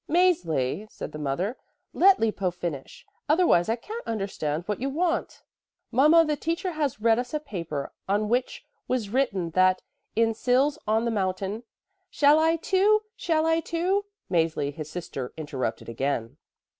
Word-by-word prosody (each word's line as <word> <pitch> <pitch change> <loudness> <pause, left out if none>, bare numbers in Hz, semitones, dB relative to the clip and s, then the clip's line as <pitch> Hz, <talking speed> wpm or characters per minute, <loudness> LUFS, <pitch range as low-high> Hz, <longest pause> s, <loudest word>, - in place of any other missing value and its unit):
"Mäzli," 215 - +1
said - - -7
the 150 - -7
mother, 170 - -2 0.4
"let 390 +1 +5
Lippo 210 -4 0
finish; 175 -6 -6 0.2
otherwise 305 - +4
I 225 - +2
can't 435 - -8
understand 195 -8 -2
what 210 0 -2
you 270 - 0
want." 335 +4 -1 0.5
"Mama, 305 +7 +6
the 300 -1 0
teacher 335 +5 -2
has 295 -7 -2
read 225 +1 +3
us 250 +4 -4
a - - +1
paper, 170 - -5 0.2
on 205 +2 +1
which 245 +3 -1 0.2
was 240 -5 -1
written 200 -10 0
that 185 +1 +3 0.3
in 225 0 +3
Sils 265 +6 +2
on 220 +2 +2
the 235 - 0
mountain 195 +1 -2 0.2
" 390 -1 -50
"Shall 295 +1 +6
I, 325 +1 +3
too? 400 +5 +3
Shall 320 -5 +1
I, 325 0 +3
too?" 360 +5 0 0.3
Mäzli, 160 -4 +1
his 155 0 -7
sister, 150 -7 -6
interrupted 135 -7 -4
again. 120 +1 -2
225 Hz, 155 wpm, -26 LUFS, -, 0.5 s, Mama